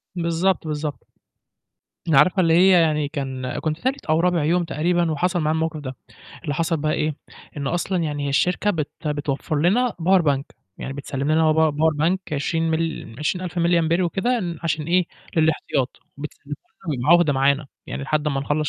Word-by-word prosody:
بالضبط، 170 0 0
بالضبط. 150 -1 -4 1.0
ن 155 - +4
عارفة 185 +7 +5
اللي 165 -2 +3
هي 185 +3 +6
يعني 150 -2 +1
كان 130 -3 -4
كنت 155 0 -2
تالت 265 +5 -2
أو 155 +1 +2
رابع 175 -2 +2
يوم 175 +3 +2
تقريبًا 170 +1 0
وحصل 175 +3 0
معايا 155 0 +1
الموقِف 160 0 -2
ده، 130 -3 -6 0.5
اللي 145 - -2
حصل 165 +2 0
بقى 155 0 -1
إيه، 155 -1 -1 0.4
إنه 140 +3 -2
أصلًا 175 0 -1
يعني 145 -2 -2
هي - - -1
الشركة 180 +8 +1
بت 155 -6 -2 0.2
بتوفّر 145 0 -2
لنا 230 +9 +3
power 185 +1 +5
bank، 140 -3 +1 0.4
يعني 135 - -5
بتسلِّم 140 +1 -2
لنا 155 0 +4
power 160 -1 +3
power 155 0 +2
bank 180 +3 +3 0.2
20 165 +3 0
مل 160 -7 -2
20000 180 +3 -2
مللي 170 0 +3
أمبير 170 +2 +1
وكده 230 +8 0
ن 170 -4 -4
عشان 160 -2 -1
إيه، 180 +2 +3 0.3
للإحتياط، 155 -4 0 0.2
وبتسلِّمه 145 0 -7 0.3
لنا 145 - 0
بيبقى 125 +4 -3
عُهدة 170 -4 +5
معانا، 140 +2 +2 0.2
يعني - - -5
لحد 150 +1 -1
أمّا 140 -2 0
نخلّص 150 +2 -1
160 Hz, 185 wpm, -22 LUFS, 145-175 Hz, 1.0 s, هي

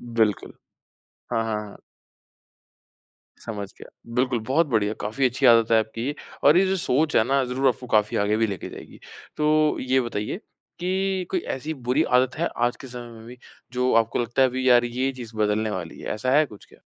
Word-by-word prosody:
बिल्कुल। 110 -3 +1 0.8
हाँ, 115 - +1
हाँ, 110 -1 -1
हाँ। 100 - -13 1.7
समझ 105 -3 -5
गया। - - -12 0.2
बिल्कुल, 125 -1 +1
बहुत 140 +8 +1
बढ़िया। 110 -4 0
काफ़ी 115 +6 -1
अच्छी 130 +2 +1
आदत 115 -1 +6
है 110 - +6
आपकी 115 +2 -3
ये 145 - -2 0.3
और 145 +4 +7
ये 190 - +4
जो 190 +1 +1
सोच 155 -2 +1
है 110 - +5
ना, 135 +1 +2
ज़रूर 130 +2 +1
आपको 125 +1 -2
काफ़ी 105 -2 +2
आगे 105 +1 +1
भी 115 0 +2
लेके 100 -4 -5
जाएगी। - - -12 0.4
तो 155 0 +2
ये 130 +1 +2
बताइए 115 - -3 0.4
कि 190 0 -1
कोई 185 - 0 0.2
ऐसी 155 +4 -5
बुरी 130 +3 0 0.2
आदत 130 +1 0
है, 170 +2 0
आज 120 +1 +1
के 135 - -11
समय 120 -1 -8
में 110 - -13
भी, 125 +1 -11 0.3
जो 125 +1 +1
आपको 110 - -4
लगता 120 +3 +1
है, 130 - +5
"अभी 130 +1 -1
यार, 120 -1 +6
ये 130 +3 -1
चीज़ 115 -3 -10
बदलने 105 +1 +1
वाली 90 -5 -6
है।" - - -7
ऐसा 125 +4 -2
है 155 0 +4
कुछ 105 -5 -14
क्या? - - -21
125 Hz, 200 wpm, -24 LUFS, 110-135 Hz, 1.7 s, और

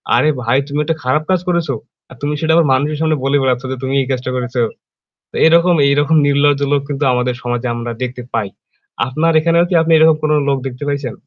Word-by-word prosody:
আরে 155 - +3
ভাই 120 +2 +1
তুমি 145 0 -3
একটা 160 +2 -1
খারাপ 130 +5 0
কাজ 185 - +2
করেছো, 170 -5 0 0.4
আর - - -13
তুমি 145 +1 -2
সেটা 160 +1 +1
আবার 170 -1 +4
মানুষের 145 +3 0
সামনে 160 -1 +1
বলে 135 +1 +2
বেড়াচ্ছ 130 -1 0
যে, 130 - -4
"তুমি 130 +1 -2
এই 130 - -3
কাজটা 130 0 -3
করেছো?" 125 0 -2 0.7
তো - - -13
এরকম 170 +2 +4
এইরকম 145 +3 +2
নির্লজ্জ 145 0 +2
লোক 145 - +2
কিন্তু 145 0 -2
আমাদের 125 0 -1
সমাজে 120 0 -2
আমরা 120 0 -5
দেখতে 125 0 -5
পাই। 110 -3 -1 0.6
আপনার 155 +6 0
এখানেও 170 +2 +2
কি - - -2
আপনি 165 +1 0
এরকম 160 0 +5
কোন 155 - +1 0.2
লোক 140 - +1
দেখতে 125 +2 -8
পাইছেন? 140 -4 -3
140 Hz, 215 wpm, -16 LUFS, 125-155 Hz, 0.7 s, এরকম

